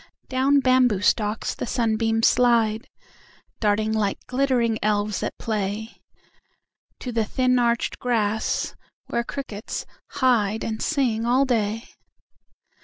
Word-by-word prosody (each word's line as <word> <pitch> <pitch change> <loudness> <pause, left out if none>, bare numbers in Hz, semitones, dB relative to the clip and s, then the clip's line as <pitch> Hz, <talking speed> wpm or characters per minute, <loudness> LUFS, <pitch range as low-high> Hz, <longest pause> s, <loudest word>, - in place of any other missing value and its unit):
Down 270 +2 +3
bamboo 255 -6 +3
stalks 210 +1 +1
the - - -5
sunbeams 225 -2 +1
slide, 230 -3 +2 0.7
Darting 215 0 +1
like 210 -2 0
glittering 250 -4 +1
elves 210 -1 0
at - - -4
play, 215 0 -3 1.0
To 250 - -4
the 225 -1 +1
thin 255 +3 +1
arched 235 -1 0
grass 220 -3 0 0.4
where 235 - 0
crickets 235 -5 -6 0.3
hideAnd 225 -4 +1
sing 240 -7 0
all 255 +3 +3
day. 225 -2 -1
225 Hz, 110 wpm, -24 LUFS, 215-250 Hz, 1.0 s, Down